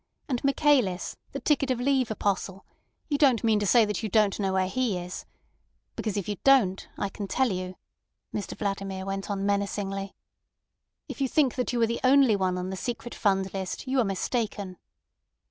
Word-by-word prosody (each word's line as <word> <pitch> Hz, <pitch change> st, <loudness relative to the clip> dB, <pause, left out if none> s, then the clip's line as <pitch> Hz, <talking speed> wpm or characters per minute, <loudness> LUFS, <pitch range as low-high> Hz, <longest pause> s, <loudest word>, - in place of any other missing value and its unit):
And 250 Hz, -4 st, -2 dB
Michaelis, 275 Hz, -9 st, +2 dB, 0.2 s
the -, -, -4 dB
ticket 280 Hz, -3 st, +1 dB
of 255 Hz, -2 st, 0 dB
leave 260 Hz, -1 st, +2 dB
apostle—you 200 Hz, +7 st, -4 dB
don't 260 Hz, -7 st, +4 dB
mean 220 Hz, -2 st, +3 dB
to 205 Hz, -, -1 dB
say 240 Hz, -, +6 dB
you 210 Hz, +1 st, -3 dB
don't 210 Hz, 0 st, +2 dB
know 195 Hz, -2 st, 0 dB
where 190 Hz, 0 st, +1 dB
he 225 Hz, -1 st, 0 dB
is? 180 Hz, +1 st, -7 dB, 0.7 s
Because 215 Hz, -2 st, -3 dB
if 200 Hz, -, -3 dB
you 205 Hz, -1 st, -3 dB
don't, 235 Hz, -9 st, +4 dB
I 200 Hz, -, -1 dB
can 200 Hz, +1 st, -6 dB
tell 260 Hz, +2 st, +1 dB
you," 185 Hz, 0 st, -4 dB, 0.6 s
Mr 205 Hz, -, -4 dB
Vladimir 195 Hz, -2 st, -3 dB
went 195 Hz, +1 st, -4 dB
on 200 Hz, -1 st, -2 dB
menacingly. 200 Hz, -1 st, -2 dB, 0.9 s
"If -, -, -7 dB
you 270 Hz, -, +2 dB
imagine 280 Hz, -5 st, +3 dB
that 250 Hz, -, 0 dB
you 245 Hz, -, -1 dB
are -, -, +6 dB
the 235 Hz, +1 st, -2 dB
only 260 Hz, -3 st, +5 dB
one 185 Hz, -2 st, 0 dB
on 180 Hz, +1 st, -3 dB
the -, -, -3 dB
secret 240 Hz, +2 st, -4 dB
fund 195 Hz, -2 st, 0 dB
list, 190 Hz, -2 st, -4 dB
you 260 Hz, +1 st, +1 dB
are -, -, +5 dB
mistaken." 200 Hz, -1 st, -2 dB
205 Hz, 180 wpm, -27 LUFS, 195-250 Hz, 0.9 s, say